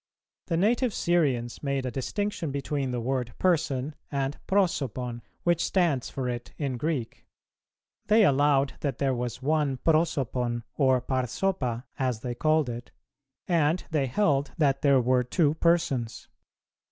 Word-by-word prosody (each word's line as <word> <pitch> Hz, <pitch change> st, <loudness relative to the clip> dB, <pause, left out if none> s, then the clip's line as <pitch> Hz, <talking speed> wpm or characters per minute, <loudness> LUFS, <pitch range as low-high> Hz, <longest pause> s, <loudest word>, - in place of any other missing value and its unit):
The 165 Hz, -, 0 dB
native 230 Hz, +5 st, +2 dB
Syrians 135 Hz, -9 st, 0 dB
made 140 Hz, -2 st, -1 dB
a 125 Hz, -, -2 dB
distinction 170 Hz, -, -2 dB
between 140 Hz, -1 st, -2 dB
the 125 Hz, -1 st, -2 dB
word 125 Hz, -1 st, -2 dB
"Person," 155 Hz, -6 st, +1 dB, 0.2 s
and 140 Hz, 0 st, -1 dB
"Prosopon," 135 Hz, -, 0 dB, 0.2 s
which 175 Hz, -1 st, +2 dB
stands 170 Hz, -9 st, +1 dB
for 130 Hz, -2 st, -3 dB
it 120 Hz, -1 st, -5 dB
in 135 Hz, -4 st, -2 dB
Greek; 135 Hz, -4 st, -3 dB, 0.8 s
they 215 Hz, 0 st, +6 dB
allowed 140 Hz, -1 st, +3 dB
that 140 Hz, -2 st, -2 dB
there 135 Hz, -2 st, +1 dB
was 125 Hz, +1 st, -4 dB
one 150 Hz, -2 st, +1 dB
Prosopon 130 Hz, -7 st, 0 dB
or 130 Hz, -3 st, +3 dB
Parsopa, 130 Hz, -1 st, -1 dB
as 125 Hz, -4 st, -1 dB
they 125 Hz, -1 st, -3 dB
called 155 Hz, +3 st, +2 dB
it, 120 Hz, 0 st, -6 dB, 0.6 s
and 165 Hz, 0 st, +2 dB
they 145 Hz, -4 st, +1 dB
heldthat 140 Hz, -2 st, +1 dB
there 140 Hz, -3 st, +5 dB
were 125 Hz, +1 st, +3 dB
two 145 Hz, +4 st, +2 dB
Persons. 160 Hz, -8 st, 0 dB
140 Hz, 135 wpm, -27 LUFS, 125-160 Hz, 0.8 s, they